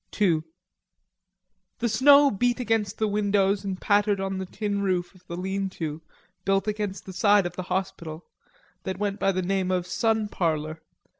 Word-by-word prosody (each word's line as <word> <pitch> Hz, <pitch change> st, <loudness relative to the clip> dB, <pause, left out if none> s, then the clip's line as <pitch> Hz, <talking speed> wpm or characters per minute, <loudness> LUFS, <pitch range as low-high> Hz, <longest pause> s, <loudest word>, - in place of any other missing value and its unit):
II 170 Hz, -6 st, +3 dB, 1.4 s
The 240 Hz, -, 0 dB
snow 280 Hz, +5 st, +6 dB
beat 245 Hz, +4 st, +1 dB
against 225 Hz, -3 st, 0 dB
the 220 Hz, -, +1 dB
windows 200 Hz, -1 st, +1 dB
and 190 Hz, -2 st, -4 dB
pattered 205 Hz, -1 st, +2 dB
on 195 Hz, 0 st, -2 dB
the 190 Hz, -, -4 dB
tin 205 Hz, 0 st, -2 dB
roof 180 Hz, -2 st, -1 dB
of 180 Hz, -1 st, -22 dB
the 170 Hz, -, -5 dB
lean 190 Hz, +1 st, -2 dB
to, 155 Hz, -1 st, -4 dB, 0.4 s
built 195 Hz, +1 st, +1 dB
against 210 Hz, -2 st, -3 dB
the 190 Hz, -, -8 dB
side 205 Hz, +1 st, +4 dB
of 175 Hz, 0 st, -4 dB
the -, -, -3 dB
hospital, 170 Hz, -4 st, -3 dB, 0.6 s
that 190 Hz, -2 st, -4 dB
went 205 Hz, 0 st, -2 dB
by 195 Hz, -, +2 dB
the 185 Hz, -1 st, -1 dB
name 190 Hz, 0 st, 0 dB
of 180 Hz, -1 st, 0 dB
sun 220 Hz, +3 st, 0 dB
parlor. 160 Hz, -4 st, -2 dB
195 Hz, 170 wpm, -26 LUFS, 185-210 Hz, 1.4 s, snow